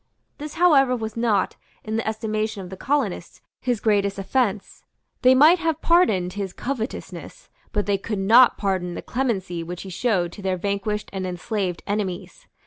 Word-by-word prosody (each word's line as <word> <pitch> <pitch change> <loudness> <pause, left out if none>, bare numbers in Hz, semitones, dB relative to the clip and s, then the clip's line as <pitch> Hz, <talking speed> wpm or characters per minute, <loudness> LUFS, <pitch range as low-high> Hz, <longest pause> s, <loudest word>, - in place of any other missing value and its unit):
This 300 0 -7
however 285 -7 +4
was 220 -2 -5
not, 230 -4 +1 0.3
in 220 0 -4
the 225 - -2
estimation 215 -2 -2
of 180 - -10
the - - -6
colonists, 240 -8 -2 0.2
his 245 -4 0
greatest 200 -2 +1
offence. 200 0 -1 0.4
They 255 0 +6
might 310 +7 +6
have 325 -2 -1
pardoned 215 - +3
his 195 -3 -4
covetousness; 250 -2 -6 0.2
but 205 -1 -1
they 200 -1 +1
could 210 +1 -4
not 230 +6 +6
pardon 185 -3 -1
the - - -6
clemency 195 -9 -2
which 175 +1 -6
he 190 - -8
showed 180 -4 0
to 205 - -10
their 190 -1 -1
vanquished 200 +2 -2
and 190 -1 -3
enslaved 180 0 -3
enemies. 200 -3 -4
210 Hz, 165 wpm, -23 LUFS, 190-245 Hz, 0.4 s, They